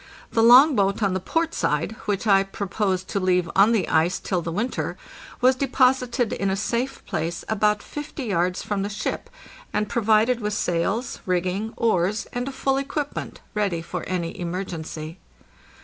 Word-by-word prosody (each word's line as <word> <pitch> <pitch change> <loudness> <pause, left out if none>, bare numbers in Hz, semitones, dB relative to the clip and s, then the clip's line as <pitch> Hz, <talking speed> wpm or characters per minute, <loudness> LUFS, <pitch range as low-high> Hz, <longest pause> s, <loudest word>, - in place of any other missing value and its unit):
The 225 - +2
long 255 +6 +8
boat 200 +1 +1
on 195 -2 +2
the 185 - 0
port 330 - -1
side, 150 +9 -1
which 205 +1 -1
I 195 -2 +5
proposed 195 -1 -2
to 200 - -1
leave 180 -2 +2
on 200 +4 +6
the 215 -7 +1
ice 165 +4 +2
till 180 -3 -2
the 165 - -4
winter, 215 +9 -2 0.4
was 255 +1 +6
deposited 255 -2 +2
in 195 - -1
a 190 - +1
safe 235 +6 -2
place 165 +2 -3
about 210 -1 +1
50 295 -1 -6
yards 180 -4 0
from 205 -2 -2
the 200 - -2
ship, 210 +1 -4 0.4
and 210 0 0
provided 225 +2 +2
with 210 -2 -2
sails, 195 +6 -1
rigging, 185 +4 -1
oars, 210 -1 +1
and 245 +1 -2
a - - -3
full 270 0 0
equip 280 +1 -3
ment, - - -6
ready 195 -6 -1
for 180 +1 -5
any 175 -2 -3
emergency. 170 -2 -5
205 Hz, 170 wpm, -24 LUFS, 180-235 Hz, 0.4 s, long